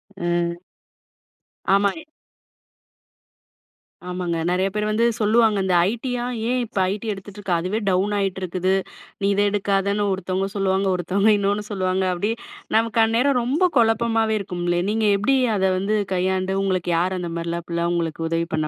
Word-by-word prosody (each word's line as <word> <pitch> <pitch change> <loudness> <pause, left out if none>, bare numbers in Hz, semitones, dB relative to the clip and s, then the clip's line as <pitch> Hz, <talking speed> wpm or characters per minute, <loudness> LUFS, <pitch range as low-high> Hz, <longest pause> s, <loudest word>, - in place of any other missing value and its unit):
அ. 175 -1 -1 1.1
ஆமாங்க. 200 +10 +1 2.1
ஆமாங்க. 180 -2 -2
நெறைய 185 +2 +1
பேர் 210 0 0
வந்து 225 +2 +2 0.2
சொல்லுவாங்க. 220 0 +3
இந்த 185 -1 +2 0.2
ஐடியா, 245 +1 -3 0.3
"ஏன் 250 0 +1
இப்போ 210 - -4
ஐடி 210 +2 -6
எடுத்துகிட்டு 200 0 -8
இருக்க 195 -3 -2
அதுவே 185 +6 -2
டவுன் 195 +3 +1
ஆகிட்டு 195 -1 -1
இருக்குது. 185 +1 0 0.5
நீ 200 - +2
இதை 205 0 +3
எடுக்காதன்னு." 200 0 0
ஒருத்தவங்க 190 +1 -2
சொல்லுவாங்க. 195 0 +1
ஒருத்தவங்க 195 +5 +2
இன்னொன்னு 205 +1 0
சொல்லுவாங்க. 190 -1 0
அப்படி 205 +5 -1 0.5
நமக்கு 225 0 +2
அந்நேரம் 245 +4 +2
ரொம்ப 280 +9 0
குழப்பமாகவே 225 -1 +2
இருக்கும்லே, 175 -2 -1
நீங்க 220 0 +1
எப்படி 270 +7 +2 0.2
அத 190 - +1
வந்து 205 +3 0 0.2
கையாண்டு 185 +1 0
உங்களுக்கு 185 -2 0
யார் 185 +2 0
அந்த 170 -1 -4
மாதிரிலாம், 170 0 -3
அப்படிலாம் 170 0 -1
உங்களுக்கு 165 -1 -2
உதவி 165 0 -1
பண்ணா 155 -1 -1
195 Hz, 145 wpm, -22 LUFS, 180-215 Hz, 2.1 s, சொல்லுவாங்க